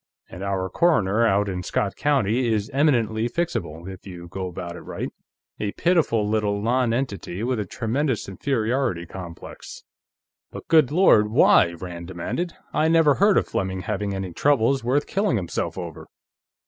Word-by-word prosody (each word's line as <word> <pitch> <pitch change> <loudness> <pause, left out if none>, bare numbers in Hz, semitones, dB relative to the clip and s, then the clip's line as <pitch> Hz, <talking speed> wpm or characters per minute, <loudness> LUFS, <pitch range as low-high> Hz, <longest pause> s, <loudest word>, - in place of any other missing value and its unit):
And 90 - -9
our 95 -1 -1
coroner, 115 - +2
out 100 0 +2
in 90 -2 -3
Scott 100 +2 -2
County, 125 -4 +1
is 105 +2 -1
eminently 120 -6 +2
fixable, 85 - -3
if 95 +1 -9
you 85 -2 -9
go 95 +1 -4
about 85 -1 -6
it - - -8
right; - - -5 0.5
a 105 -1 -2
pitiful 155 - +2
little 105 -1 0
nonentity 115 -4 -1
with 125 -1 0
a 105 - -2
tremendous 125 - -2
inferiority 115 -2 -1
complex." 85 -1 -10 0.7
"But - - -10
good 155 -5 +5
Lord, 150 - +5
why?" 100 -5 +5
Rand 85 0 -8
demanded. 165 - -4 0.2
"I 155 - +2
never 160 -3 +5
heard 200 +5 +4
of - - +2
Fleming 95 -1 -2
having 100 +1 -3
any 95 -2 -5
troubles 135 +2 +2
worth 135 +5 +1
killing 200 - 0
himself 90 -6 -3
over." - - -7
110 Hz, 155 wpm, -24 LUFS, 95-135 Hz, 0.7 s, good